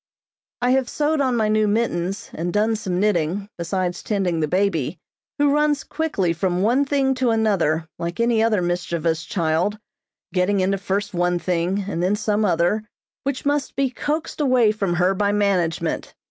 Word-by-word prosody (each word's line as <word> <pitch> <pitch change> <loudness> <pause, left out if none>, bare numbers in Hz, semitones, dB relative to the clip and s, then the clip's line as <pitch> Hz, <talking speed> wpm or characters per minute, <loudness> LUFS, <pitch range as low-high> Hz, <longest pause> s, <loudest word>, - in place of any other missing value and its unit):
I 250 - +3
have 260 -2 +2
sewed 300 0 0
on 260 -2 +1
my 220 -1 +2
new 215 0 +2
mittens, 200 -3 -1
and 170 +2 -3
done 215 +4 +2
some 190 -5 -2
knitting, 195 0 0
besides 180 +1 -2
tending 190 -6 -1
the 155 - +1
baby, 175 -3 0 0.4
who 285 -1 +3
runs 300 -1 +2
quickly 250 - -1
from 180 +2 0
one 250 +6 +3
thing 270 -1 +1
to 255 -1 0
another 195 -8 +1
like 170 +3 -4
any 235 -1 +3
other 220 -5 +2
mischievous 170 -2 -1
child, 170 +4 0 0.6
getting 190 +2 +2
into 190 +1 +1
first 200 +1 -2
one 175 0 +1
thing, 180 +3 -1
and 175 -4 -2
then 185 +3 +2
some 210 0 0
other, 175 +4 +1 0.4
which 275 -1 -2
must 285 0 0
be 270 -1 +1
coaxed 305 +4 -3
away 255 -6 +4
from 195 -5 -1
her 180 +2 +3
by 200 +1 +1
management. 195 -5 0
200 Hz, 170 wpm, -22 LUFS, 175-230 Hz, 0.6 s, away